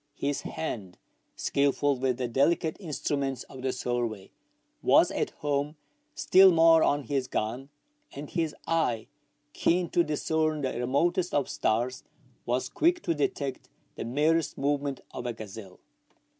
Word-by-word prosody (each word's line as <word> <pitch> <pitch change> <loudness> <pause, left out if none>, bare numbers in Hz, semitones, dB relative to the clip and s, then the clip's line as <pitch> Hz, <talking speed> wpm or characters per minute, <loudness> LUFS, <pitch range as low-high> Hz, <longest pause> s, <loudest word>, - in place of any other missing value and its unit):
His 145 0 -2
hand, 100 - -5 0.4
skilful 140 0 +1
with 130 -1 0
the 125 -1 -2
delicate 155 +6 +1
instruments 140 - -2
of 130 - -11
the 130 0 0
survey, 120 -5 -3 0.5
was - - +5
at - - -1
home 145 +1 -2 0.4
still 190 -6 +6
more 165 -1 +6
on 145 -1 +2
his 135 +1 -1
gun; 120 +6 -3 0.4
and 145 +1 -7
his 165 -2 -2
eye, 125 -10 0 0.5
keen 175 0 +1
to 175 - +4
discern 155 0 0
the 130 -2 -1
remotest 165 +9 0
of 145 -2 +1
stars, 120 +3 -1 0.4
was 125 +2 0
quick 345 - +1
to - - +1
detect 140 -2 -2 0.2
the - - -6
njierest 150 +7 +1
movement 140 -1 -1
of 125 - -5
a 120 - -2
gazelle. 105 -3 -10
140 Hz, 140 wpm, -28 LUFS, 125-160 Hz, 0.5 s, still